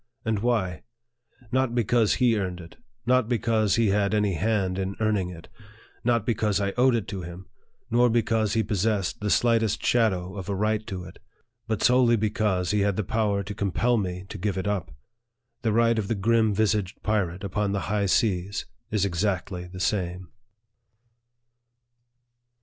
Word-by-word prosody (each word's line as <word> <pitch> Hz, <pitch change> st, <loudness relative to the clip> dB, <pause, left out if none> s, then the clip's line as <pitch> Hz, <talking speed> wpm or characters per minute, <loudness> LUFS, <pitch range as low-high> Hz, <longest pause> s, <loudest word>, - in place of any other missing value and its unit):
And 110 Hz, -2 st, 0 dB
why? 105 Hz, -8 st, 0 dB, 0.7 s
Not 130 Hz, -2 st, +1 dB
because 115 Hz, -1 st, +2 dB
he 120 Hz, -3 st, +3 dB
earned 90 Hz, -4 st, -2 dB
it, 85 Hz, -1 st, -12 dB, 0.3 s
not 125 Hz, -1 st, +2 dB
because 110 Hz, -3 st, +1 dB
he 115 Hz, -3 st, +2 dB
had 100 Hz, +1 st, +1 dB
any 105 Hz, -2 st, +1 dB
hand 95 Hz, 0 st, 0 dB
in 95 Hz, 0 st, -3 dB
earning 105 Hz, -4 st, +1 dB
it, 85 Hz, -2 st, -10 dB, 0.6 s
not 115 Hz, -3 st, +1 dB
because 105 Hz, -3 st, +1 dB
I 100 Hz, -1 st, 0 dB
owed 125 Hz, 0 st, +4 dB
it 115 Hz, -, -2 dB
to 95 Hz, -2 st, -4 dB
him, 85 Hz, +2 st, -9 dB, 0.5 s
nor 120 Hz, +1 st, +4 dB
because 110 Hz, -2 st, +1 dB
he 110 Hz, -, +2 dB
possessed 100 Hz, -2 st, -1 dB
the 105 Hz, -, -2 dB
slightest 115 Hz, -2 st, +2 dB
shadow 95 Hz, -6 st, +1 dB
of 95 Hz, 0 st, -6 dB
a 100 Hz, -, -1 dB
right 105 Hz, +2 st, 0 dB
to 95 Hz, -2 st, -5 dB
it; -, -, -12 dB, 0.5 s
but 110 Hz, -2 st, -1 dB
solely 125 Hz, -1 st, +5 dB
because 105 Hz, -4 st, 0 dB
he 105 Hz, -, +1 dB
had 100 Hz, -1 st, +1 dB
the 105 Hz, -, -1 dB
power 100 Hz, 0 st, 0 dB
to 100 Hz, +2 st, -6 dB
compel 105 Hz, +5 st, +1 dB
me 90 Hz, -2 st, -3 dB
to 105 Hz, -, -7 dB
give 100 Hz, 0 st, -1 dB
it 95 Hz, -, -2 dB
up. 100 Hz, -5 st, -2 dB, 0.7 s
The 115 Hz, -, +1 dB
right 115 Hz, +1 st, +3 dB
of 100 Hz, -, -3 dB
the 115 Hz, -, 0 dB
grim 110 Hz, +1 st, +2 dB
vis 110 Hz, 0 st, +3 dB
aged 105 Hz, -1 st, -4 dB
pirate 95 Hz, -4 st, -1 dB
upon 100 Hz, +1 st, -1 dB
the 100 Hz, -1 st, -1 dB
high 100 Hz, +2 st, 0 dB
seas 100 Hz, -2 st, 0 dB, 0.2 s
is 105 Hz, -3 st, +1 dB
exactly 90 Hz, -1 st, -2 dB
the 90 Hz, +1 st, -9 dB
same. 90 Hz, -2 st, -2 dB
105 Hz, 170 wpm, -26 LUFS, 95-115 Hz, 0.7 s, solely